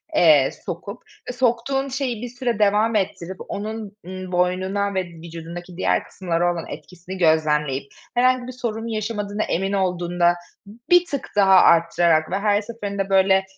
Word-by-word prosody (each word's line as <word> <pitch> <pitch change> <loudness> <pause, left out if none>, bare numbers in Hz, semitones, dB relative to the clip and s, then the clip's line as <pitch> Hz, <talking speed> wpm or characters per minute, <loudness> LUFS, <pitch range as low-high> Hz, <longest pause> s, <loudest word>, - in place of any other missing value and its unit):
eee, 150 - +6 0.2
sokup, 200 +7 -6 0.3
e, - - -3
soktuğun 255 +3 0
şeyi 260 -4 -3
bir 245 - -5
süre 245 -2 -3
devam 210 +2 +3
ettirip, 190 -2 -2
onun, 215 0 -5
eee, 185 0 -7
boynuna 185 +3 0
ve 190 - 0
vücudundaki 170 +1 -9
diğer - - +1
kısımlara 175 -1 -1
olan 165 -2 -6
etkisini 180 +1 -9
gözlemleyip, 150 -4 +2 0.3
herhangi 250 0 +2
bir - - -5
sorun 230 -3 -4
yaşamadığına 215 -1 -2
emin 195 +3 -1
olduğunda 175 -2 +1 0.6
bir 355 0 +6
tık 280 -5 -5
daha 195 -2 +5
arttırarak 170 -2 +4
ve 195 - 0
her 205 0 +2
seferinde, 205 -3 -4
böyle, 190 0 +4
195 Hz, 145 wpm, -22 LUFS, 175-225 Hz, 0.6 s, eee